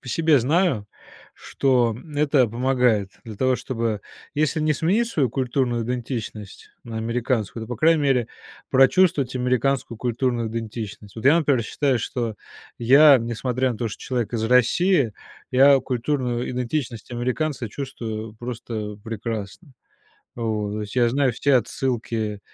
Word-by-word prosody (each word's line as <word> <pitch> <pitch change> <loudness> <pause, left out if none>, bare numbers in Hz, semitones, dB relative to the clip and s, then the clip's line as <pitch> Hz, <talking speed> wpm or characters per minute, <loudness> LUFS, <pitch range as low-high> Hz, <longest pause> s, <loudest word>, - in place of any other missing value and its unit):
По 125 - -10
себе 160 +3 +3
знаю, 135 - +1 0.5
что, 125 -3 +1
м, 145 +4 -11
это 145 -3 +3
помогает 120 -3 +1
для 110 -2 -8
того, 130 +3 +2
чтобы 115 -4 -3 0.3
если 155 +2 +1
не 155 0 +2
сменить 200 +11 +1
свою 140 - 0
культурную 125 -2 -1
идентичность 115 -4 -5
на 115 -1 -7
американскую, 115 -1 -2
то, - - -14
по 120 - -4
крайней 160 +2 +3
мере, 130 -5 +2 0.4
прочувствовать 135 -1 +4
американскую 125 0 0
культурную 120 -1 -1
идентичность. 110 -2 -6
Вот 110 - -7
я, 140 +5 +6
например, 140 -7 +2
считаю, 130 +3 0
что 115 -2 -3 0.4
я, 140 +5 +7
несмотря 125 +2 -1
на 110 - -8
то, 115 - -1
что 100 - -8
человек 120 -4 -2
из 110 - -1
России, 125 - +3 0.4
я 135 +1 +6
культурную 125 -1 -2
идентичность 125 -2 -3
американца 125 +2 -2
чувствую 110 -4 -6
просто 110 -3 -6
прекрасно. 115 - -6 0.6
Вот. 110 -3 -2
То 105 - -3
есть 105 +3 -8
я 120 -1 +4
знаю 135 +1 +1
все 140 +5 +1
отсылки, 115 -4 -1
125 Hz, 140 wpm, -23 LUFS, 115-135 Hz, 0.6 s, я